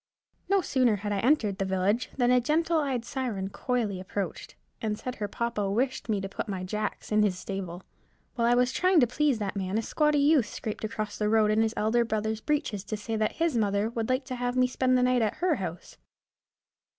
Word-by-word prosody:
No 395 -1 +4
sooner 255 -9 +2
had 205 +1 -4
I 200 - 0
entered 225 -5 +2
the - - +1
village, 190 +5 0
than 245 -1 +3
a 250 0 +5
gentle 320 +5 +1
eyed 265 -5 -1
siren 230 -8 -3
coyly 225 -7 -1
approached, 190 0 -5 0.3
and 215 -1 -1
said 255 +2 -6
her 205 - -2
papa 210 -2 -2
wished 250 +4 -1
me 210 -2 +1
to 195 - -3
put 195 - -5
my 190 -2 -3
jacks 210 +4 -4
in 215 0 +4
his 200 -4 +2
stable. 185 -2 -5 0.5
While 235 -2 +1
I 240 - +4
was 250 +1 +3
trying 365 +2 +3
to - - +6
please 275 +2 +1
that 205 -2 -3
man, 190 +1 -2
a 225 - 0
squatty 300 +5 +2
youth 285 -5 +4
scraped 215 +1 -6
across 215 -1 -4
the 210 -1 +1
road 215 -1 +4
in 215 +1 +3
his 225 0 0
elder 220 +3 +2
brother's 220 -1 -2
breeches 260 -10 -1
to 215 - -3
say 225 +2 -4
that 215 0 0
his 330 -4 0
mother 205 0 +1
would 230 -1 -3
like 255 +1 0
to 255 - -4
have 245 0 -2
me 255 - +5
spend 255 0 +2
the 250 - +2
night 250 -1 +3
at 215 -2 0
her 350 -2 +1
house. 175 -2 -6
225 Hz, 225 wpm, -28 LUFS, 205-255 Hz, 0.5 s, to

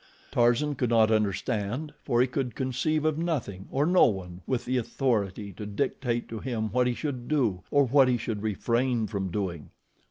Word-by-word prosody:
Tarzan 120 +5 +3
could 125 -3 -1
not 110 -2 +4
understand, 110 +6 -1
for 120 0 +2
he - - +5
could 130 -1 -3
conceive 140 +4 0
of 155 0 +1
nothing, 125 - -3
or 140 +2 +1
no 180 +2 +6
one, 90 -5 -4
with 130 -2 -1
the 130 +1 0
authority 105 -5 -1
to 105 +3 -7
dictate 120 +1 -1
to 115 - -5
him 110 -4 -3
what 125 +1 +2
he 125 - 0
should 130 -5 -4
do, 120 -12 +1
or 145 -1 +4
what 135 +1 +5
he 125 -1 +2
should 110 -2 -4
refrain 115 +3 0
from 100 -3 -3
doing. 85 -5 -3
120 Hz, 185 wpm, -27 LUFS, 105-135 Hz, -, no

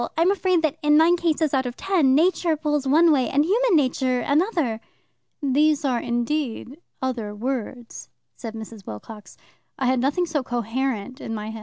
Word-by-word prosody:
I'm 340 +4 +4
afraid 370 -3 +1
that 310 -3 0
in 295 0 +4
nine 330 +3 +5
cases 320 -3 0
out 260 -2 +1
of 245 - -6
ten 315 -9 +2
Nature 330 0 +2
pulls 295 -2 -1
one 320 +4 +5
way 265 -4 +2
and 290 +2 +2
human 445 +3 +2
nature 255 -3 +1
another." 290 - 0 0.6
"These 295 +2 +2
are 250 -3 +1
indeed 245 +4 -3 0.2
'other 230 -5 -3
words,'" 245 0 -5 0.3
said 225 -3 -8
Mrs. 220 -2 -10
Wilcox." 210 - -10 0.4
I 265 - -2
had 255 0 +2
nothing 290 +8 +1
so 310 -4 -1
coherent 245 +1 -3
in 225 - -5
my 215 0 -5
head. 220 - -8
270 Hz, 170 wpm, -23 LUFS, 240-315 Hz, 0.6 s, nine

